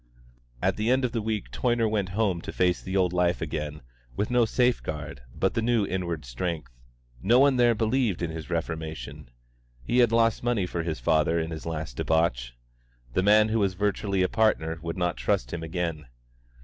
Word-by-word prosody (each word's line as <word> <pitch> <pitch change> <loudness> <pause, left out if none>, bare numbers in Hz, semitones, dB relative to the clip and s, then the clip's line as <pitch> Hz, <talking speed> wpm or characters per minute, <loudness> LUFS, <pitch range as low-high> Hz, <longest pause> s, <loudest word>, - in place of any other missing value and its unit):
At - - +1
the 110 +2 0
end 130 +1 +3
of 125 - -2
the 115 - -2
week 110 -1 -3
Toyner 120 -2 +1
went 105 -3 -1
home 100 -6 +1
to - - -6
face 90 -1 +1
the 95 +1 -2
old 90 -2 +2
life 90 -1 +2
again 75 -2 -4 0.3
with 105 - -2
no 125 -1 +4
safe 125 +2 +2
guard 75 -4 -6
but 95 +9 0
the 115 - 0
new 115 -2 +2
inward 85 -6 -3
strength. 65 +2 -4 0.5
No 115 - +4
one 135 0 +5
there 120 -1 +4
believed 110 -4 0
in 85 - -2
his 80 -1 -7
reformation. 80 -5 -4 0.5
He 120 - +1
had 120 -2 +5
lost 115 -1 +3
money 120 -6 +1
for 85 -1 -3
his 80 -4 -3
father 80 +6 +2
in 80 0 -3
his 80 0 -6
last 80 -6 -5
debauch; - - +1 0.6
the - - +2
man 105 +2 +5
who 110 +1 +1
was 95 -3 +1
virtually 100 -1 0
a - - +3
partner 90 -7 +1
would 85 +1 -4
not 90 -5 0
trust - - -1
him 85 - -3
again. 80 -3 -3
90 Hz, 195 wpm, -27 LUFS, 80-110 Hz, 0.6 s, one